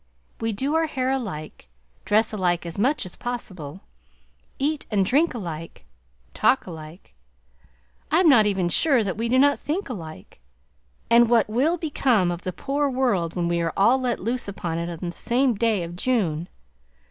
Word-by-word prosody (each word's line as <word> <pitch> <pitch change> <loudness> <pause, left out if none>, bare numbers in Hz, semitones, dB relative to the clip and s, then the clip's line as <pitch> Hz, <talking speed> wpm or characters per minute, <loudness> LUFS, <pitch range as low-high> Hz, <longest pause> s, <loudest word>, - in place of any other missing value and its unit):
We 225 0 -1
do 270 +8 -2
our 320 0 +2
hair 260 -3 -1
alike, 185 - -5 0.4
dress 215 +2 +2
alike 175 -4 0
as 170 +3 -6
much 265 +2 +1
as 180 - -10
possible, 190 -10 -6 0.8
eat 295 +2 -1
and 200 -3 +2
drink 285 - +2
alike, 165 -6 -7 0.5
talk 265 - +2
alike, 160 - -11 1.0
I 315 - +3
am 365 - +4
not 230 -8 +6
even 190 -3 0
sure 260 - +3
that 195 -3 -2
we 230 +2 -2
do 255 - +3
not 285 +2 +4
think 320 +2 -3
alike; 160 - -9 0.7
and 235 0 +6
what 235 -2 +4
will 270 +11 +1
become 255 - +1
of 175 0 -5
the 185 - -3
poor 280 +8 -1
world 240 -11 0
when 175 -2 0
we 170 0 0
are 165 -1 -1
all 230 +7 +4
let 245 -2 -1
loose 235 +4 -2
upon 170 -4 -4
it 170 +1 -3
on 170 +1 -5
the 175 - -6
same 250 +1 +1
day 215 -3 +1
of 170 +1 -7
June? 180 -7 -1
215 Hz, 175 wpm, -24 LUFS, 175-260 Hz, 1.0 s, not